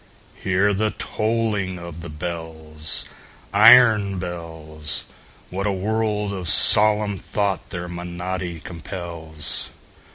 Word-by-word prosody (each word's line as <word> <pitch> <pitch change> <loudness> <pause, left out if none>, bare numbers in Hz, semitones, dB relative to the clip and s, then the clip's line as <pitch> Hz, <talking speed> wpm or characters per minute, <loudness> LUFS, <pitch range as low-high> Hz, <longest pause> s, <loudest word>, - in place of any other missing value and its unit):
Hear 95 +2 +2
the 105 +2 +1
tolling 110 -4 -1
of 85 -1 -9
the 85 - -8
bells, 80 -1 -5 0.5
Iron 110 -2 +7
bells! 80 -4 -5 0.5
What 100 +3 -2
a - - +1
world 105 +1 -1
of 90 -3 -3
solemn 105 -2 +5
thought 100 -3 -2
their 90 -2 -5
monody 90 0 -5
compels! 85 -3 -4
90 Hz, 100 wpm, -22 LUFS, 85-105 Hz, 0.5 s, Iron